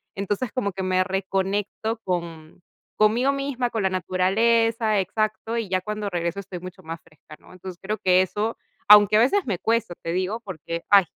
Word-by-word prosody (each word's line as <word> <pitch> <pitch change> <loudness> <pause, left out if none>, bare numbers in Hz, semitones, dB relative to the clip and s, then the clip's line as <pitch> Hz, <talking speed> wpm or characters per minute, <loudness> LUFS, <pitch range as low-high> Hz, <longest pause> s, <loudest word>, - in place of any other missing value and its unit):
Entonces, 205 +4 -2
como 200 -7 -1
que 190 +1 -5
me 185 0 +2
reconecto 195 +3 -2
con 170 -2 -5 0.3
conmigo 230 +6 +3
misma, 275 -3 -2
con 225 - -2
la 190 - +2
naturaleza, 215 +4 +2
exacto, 215 +4 -2
y 225 -3 -2
ya 185 -1 0
cuando 210 0 -4
regreso 170 +2 -2
estoy 185 -2 -7
mucho 185 +1 -10
más 165 +1 -7
fresca, 155 0 -16
¿no? - - -19
Entonces 185 -1 -9
creo 210 +3 -3
que 185 -1 +4
eso 210 +5 -2 0.3
aunque 210 0 +8
a - - +5
veces 275 - +3
me 190 -5 -1
cuesta, 225 -5 0
te 165 - -3
digo, 185 +5 -1
porque, 170 -4 -6
ay, 200 -3 +7
195 Hz, 180 wpm, -24 LUFS, 185-220 Hz, 0.3 s, aunque